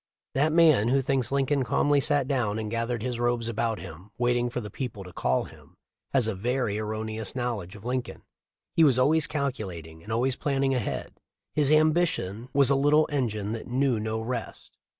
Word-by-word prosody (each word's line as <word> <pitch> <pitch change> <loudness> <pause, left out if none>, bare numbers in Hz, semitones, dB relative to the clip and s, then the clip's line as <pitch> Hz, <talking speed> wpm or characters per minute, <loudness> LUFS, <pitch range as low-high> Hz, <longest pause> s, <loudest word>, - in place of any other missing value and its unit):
"* - - -66
That 150 +4 +2
man 155 -9 +5
who 135 +3 +3
thinks 135 -2 0
Lincoln 140 0 +1
calmly 145 +4 +2
sat 145 -2 +1
down 120 -7 0
and 110 -1 -4
gathered 115 0 -2
his 125 -2 -3
robes 120 -1 0
about 115 -1 -1
him, 90 +5 -10
waiting 120 0 +1
for 125 - -3
the 105 -3 -7
people 120 -7 -5
to 90 -1 -12
call 65 0 +1
him, - - -15 0.3
has 130 -4 +2
a 110 - 0
very 115 +1 -1
erroneous 110 0 -3
knowl 120 -4 -1
edge 90 +3 -11
of 105 +1 -12
Lincoln. 125 0 -3 0.5
He 165 - +4
was 135 -5 +5
always 150 +4 +3
calculating, 95 - -4
and 105 - -9
always 125 +3 +1
planning 135 -1 0
ahead. 125 -5 -3 0.3
His 145 -2 +2
ambition 155 - +2
was 140 0 +4
a - - +4
little 145 +3 +4
engine 110 -7 -1
that 115 0 -5
knew 130 -2 +1
no 110 +1 -2
rest. 115 0 -5
120 Hz, 190 wpm, -27 LUFS, 110-140 Hz, 0.5 s, man